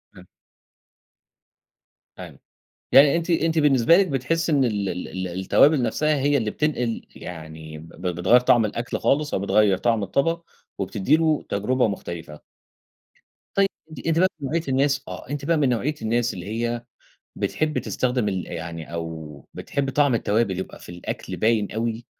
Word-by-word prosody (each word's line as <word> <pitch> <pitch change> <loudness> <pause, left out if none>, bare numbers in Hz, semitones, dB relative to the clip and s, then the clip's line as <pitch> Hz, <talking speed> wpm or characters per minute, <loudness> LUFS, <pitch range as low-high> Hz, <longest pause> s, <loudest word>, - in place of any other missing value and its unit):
إمم. 90 - -14 1.9
تمام. - - -10 0.5
يعني 140 +3 +7
أنتِ 170 +1 -2
أنتِ 165 -1 +2
بالنسبة 145 +1 +5
لِك 195 -1 +4
بتحسي 155 +5 0
إن 140 -3 +3
ال 100 -4 -1
ال 90 - -4
ال 95 -1 -4
التوابل 140 +8 +4
نفسها 155 +5 +1
هي 145 +1 +2
اللي 110 -5 0
بتنقل 125 -7 -1
يعني 80 -2 -9
ب 85 +3 -10
بتغيّر 90 +8 +4
طعم 120 -2 +4
الأكل 115 +3 -3
خالص، 145 +1 +1
أو - - 0
بتغيّر 100 -1 +3
طعم 115 -1 +1
الطبق 165 - 0 0.3
وبتدي 100 +8 +1
له 160 -2 +1
تجربة 115 +4 +1
مختلفة؟ 85 -6 -6 1.2
طيب 195 0 +4 0.2
أنتِ 155 - -9
أنتِ 165 0 +2
بقى 185 - +5
من 140 - -4
نوعية 165 +1 0
الناس 135 +1 +2
آه، - - -8
أنتِ 145 -1 -4
بقى 165 0 +2
من 140 -4 +2
نوعية 130 +5 0
الناس 120 +1 0
اللي 90 0 -7
هي 115 +2 -2 0.5
بتحب 155 -1 -1
تستخدم 125 -4 -1
ال 95 -3 -3
يعني 85 -2 -7
أو 80 -4 -6
بتحب 140 -1 -2
طعم 145 -2 +3
التوابل 105 -4 +1
يبقى 95 - -6
في - - -14
الأكل 90 0 -6
باين 110 -2 +1
أوي، 115 +1 -3
120 Hz, 160 wpm, -23 LUFS, 95-145 Hz, 1.9 s, يعني